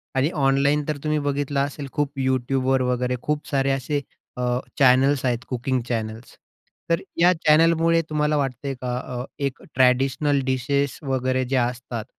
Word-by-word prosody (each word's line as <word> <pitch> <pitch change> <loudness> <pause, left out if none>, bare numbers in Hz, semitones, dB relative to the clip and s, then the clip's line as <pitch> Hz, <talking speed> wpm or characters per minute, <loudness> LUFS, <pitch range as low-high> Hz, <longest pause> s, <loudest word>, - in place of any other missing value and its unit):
आणि 135 +3 +2 0.2
ऑनलाईन 140 +2 +3
तर 150 -1 -1
तुम्ही 155 0 +1
बघितलं 145 0 -1
असेल 140 0 -2
खूप 145 -2 -1
Youtubeवर 130 0 +1
वगैरे 125 0 0
खूप 150 0 -2
सारे 135 -1 +1
असे 135 +2 -1 0.4
अ, - - -3 0.4
चॅनल्स 135 +1 +4
आहेत 120 -1 0
कुकिंग 125 0 -1
चॅनल्स 110 0 -4 0.5
तर 165 0 +2 0.2
या, 175 +2 +6
चॅनलमुळे 165 +1 +3
तुम्हाला 150 0 +1
वाटतंय 135 0 -2
का 125 -1 -2
अ, 125 -1 -5 0.2
एक 140 -2 -3
ट्रॅडिशनल 135 +3 +2
डिशेस 135 +1 0
वगैरे 130 -1 0
जे 135 - -2
असतात 120 -2 -2
135 Hz, 150 wpm, -23 LUFS, 125-145 Hz, 0.5 s, या